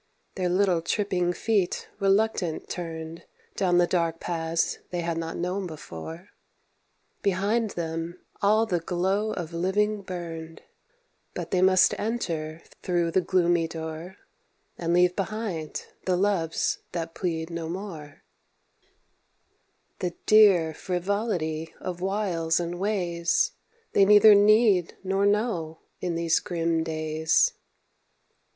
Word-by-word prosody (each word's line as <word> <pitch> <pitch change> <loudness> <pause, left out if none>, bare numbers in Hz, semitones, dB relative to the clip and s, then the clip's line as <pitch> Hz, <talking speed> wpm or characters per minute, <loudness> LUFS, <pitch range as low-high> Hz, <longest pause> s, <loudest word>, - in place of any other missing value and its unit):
Their 185 -2 -1
little 180 -2 +2
tripping 180 -1 0
feet 200 -1 0
reluctant 195 -4 +1
turned 165 -1 -6 0.3
Down 180 -2 +2
the 175 - +5
dark 170 -2 0
paths 165 -1 -1
they 175 -1 -2
had 170 0 -2
not 165 0 -4
known 180 +2 -2
before; 160 - -9 0.9
Behind 205 +4 +1
them 165 0 -4 0.2
all 215 +2 +4
the 180 -6 0
glow 190 +5 0
of 170 -4 -5
living 205 +4 0
burned, 165 -3 -7 0.7
But - - -5
they 180 - +2
must 185 0 +5
enter 165 -8 -3 0.2
thro' 175 -2 0
the 185 - +3
gloomy 175 -2 +2
door, 160 +3 -7 0.6
And 170 -1 -2
leave 180 +1 +4
behind 195 -6 -4 0.2
the 185 -1 +2
loves 180 -4 0
that 165 -1 -4
plead 165 -2 -3
no 165 -1 -4
more, 170 -5 -7 1.8
The 180 -2 -3
dear 195 -7 +6
frivolity 175 -3 -2
of 180 -1 -5
wiles 185 -5 0
and 175 0 -4
ways 185 - +1 0.4
They 195 - +6
neither 210 +1 +8
need 205 -3 +4
nor 195 +1 +1
know 195 -7 -1 0.2
in 175 -2 -2
these 165 0 +2
grim 165 -2 -1
days. 155 0 +1
175 Hz, 120 wpm, -26 LUFS, 165-195 Hz, 1.8 s, neither